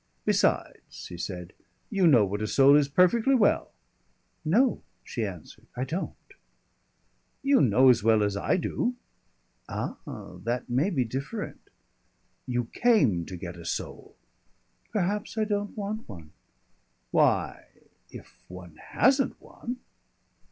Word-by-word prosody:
"Besides," -, -, 0 dB
he 90 Hz, -, -7 dB
said, 90 Hz, 0 st, -6 dB, 0.4 s
"you 190 Hz, -3 st, +3 dB
know 120 Hz, -9 st, +6 dB
what 100 Hz, +2 st, -4 dB
a 110 Hz, -, -1 dB
soul 140 Hz, +5 st, +6 dB
is 145 Hz, -1 st, +4 dB
perfectly 185 Hz, -, +3 dB
well." 215 Hz, -5 st, +2 dB, 0.7 s
"No," 225 Hz, +11 st, +2 dB, 0.2 s
she 115 Hz, -, -4 dB
answered, 90 Hz, -7 st, -8 dB
"I 125 Hz, -, -2 dB
don't." 160 Hz, +8 st, -4 dB, 1.3 s
"You 275 Hz, 0 st, +4 dB
know 130 Hz, +1 st, +5 dB
as 120 Hz, -4 st, +5 dB
well 110 Hz, -1 st, +4 dB
as 100 Hz, -1 st, 0 dB
I 100 Hz, -, +1 dB
do." 245 Hz, +7 st, -1 dB, 0.7 s
"Ah! -, -, -4 dB, 0.5 s
that 120 Hz, +2 st, -2 dB
may 130 Hz, +9 st, +1 dB
be 135 Hz, -10 st, 0 dB
different." 140 Hz, -, -6 dB, 0.8 s
"You 120 Hz, -1 st, -1 dB
came 140 Hz, -, +3 dB
to 90 Hz, -, -7 dB
get 85 Hz, 0 st, -7 dB
a 85 Hz, -, -10 dB
soul." -, -, -5 dB, 0.8 s
"Perhaps 205 Hz, +2 st, -2 dB
I 220 Hz, -, +2 dB
don't 205 Hz, -1 st, -2 dB
want 210 Hz, -, -4 dB
one. 85 Hz, -7 st, -10 dB, 0.8 s
Why -, -, +2 dB, 0.4 s
if -, -, -13 dB
one 90 Hz, -3 st, -11 dB
hasn't 270 Hz, +2 st, +1 dB
one 245 Hz, +1 st, -8 dB
135 Hz, 130 wpm, -27 LUFS, -, 1.3 s, know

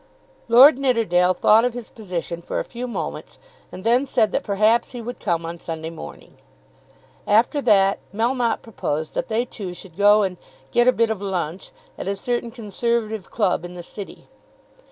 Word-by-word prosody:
Lord 255 Hz, +4 st, +8 dB
Nidderdale 185 Hz, -9 st, +2 dB
thought 220 Hz, +2 st, +5 dB
of 245 Hz, -1 st, 0 dB
his 245 Hz, -3 st, -7 dB
position 175 Hz, -5 st, -5 dB
for -, -, -3 dB
a -, -, -1 dB
few 245 Hz, +1 st, -6 dB
moments 240 Hz, -, -6 dB, 0.3 s
and 185 Hz, -, -9 dB
then 245 Hz, +5 st, +3 dB
said 220 Hz, -5 st, +2 dB
that -, -, -1 dB
perhaps 215 Hz, +5 st, +2 dB
he 245 Hz, -, -6 dB
would 240 Hz, +1 st, -7 dB
come 170 Hz, -4 st, -1 dB
on 170 Hz, +1 st, -6 dB
Sunday 160 Hz, 0 st, -6 dB
morning. 75 Hz, -, -11 dB, 0.9 s
After 235 Hz, +8 st, +3 dB
that 195 Hz, -5 st, +4 dB
Melmotte 235 Hz, +2 st, 0 dB
proposed 155 Hz, -8 st, -4 dB
that -, -, -2 dB
they 230 Hz, +2 st, 0 dB
two 195 Hz, -7 st, -7 dB
should 175 Hz, -2 st, -12 dB
go 205 Hz, +2 st, +5 dB
and 185 Hz, -2 st, -2 dB, 0.3 s
"get 240 Hz, +1 st, +3 dB
a -, -, +8 dB
bit 230 Hz, -2 st, +1 dB
of 210 Hz, -3 st, -4 dB
lunch" 185 Hz, -3 st, -3 dB, 0.3 s
at -, -, -5 dB
a 200 Hz, -, 0 dB
certain 240 Hz, +3 st, -2 dB
Conservative 220 Hz, -2 st, -2 dB
club 190 Hz, -6 st, 0 dB
in 175 Hz, 0 st, -8 dB
the 175 Hz, -, -8 dB
City. 200 Hz, +3 st, -10 dB
215 Hz, 175 wpm, -22 LUFS, 180-235 Hz, 0.9 s, Lord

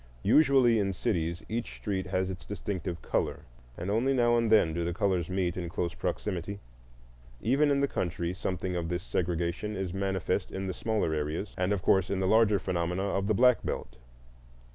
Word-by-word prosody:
Usually 130 Hz, -1 st, +5 dB
in 100 Hz, -1 st, 0 dB
cities 85 Hz, -5 st, -1 dB
each 115 Hz, +2 st, -4 dB
street 95 Hz, -3 st, -3 dB
has 95 Hz, 0 st, -1 dB
its 90 Hz, -, -8 dB
distinctive 95 Hz, -4 st, -4 dB
color, -, -, -1 dB, 0.4 s
and 90 Hz, +4 st, -3 dB
only 125 Hz, +6 st, +2 dB
now 120 Hz, -1 st, +4 dB
and 115 Hz, -2 st, +1 dB
then 95 Hz, -7 st, +5 dB
do 85 Hz, +1 st, -1 dB
the 85 Hz, 0 st, -2 dB
colors 95 Hz, -4 st, 0 dB
meet 90 Hz, -2 st, 0 dB
in 85 Hz, -2 st, -4 dB
close 85 Hz, -2 st, -2 dB
proximity. 100 Hz, 0 st, -3 dB, 0.8 s
Even 140 Hz, -, +2 dB
in 140 Hz, -1 st, +2 dB
the 140 Hz, -, +3 dB
country 85 Hz, -, -2 dB
something 90 Hz, -1 st, -3 dB
of 85 Hz, -2 st, -2 dB
this 90 Hz, 0 st, -2 dB
segregation 90 Hz, +3 st, -2 dB
is 95 Hz, -2 st, -3 dB
manifest 95 Hz, -2 st, -1 dB
in 95 Hz, 0 st, -4 dB
the 95 Hz, -, -2 dB
smaller 105 Hz, -6 st, -1 dB
areas, 75 Hz, +6 st, -3 dB
and 90 Hz, +2 st, 0 dB
of 100 Hz, -2 st, 0 dB
course 95 Hz, -2 st, +3 dB
in 100 Hz, -, -1 dB
the 95 Hz, -, 0 dB
larger 105 Hz, +1 st, +4 dB
phenomena 90 Hz, 0 st, -1 dB
of 95 Hz, 0 st, -1 dB
the 110 Hz, -, +2 dB
Black 125 Hz, +2 st, +5 dB
Belt. -, -, -4 dB
95 Hz, 185 wpm, -29 LUFS, 85-105 Hz, 0.8 s, Usually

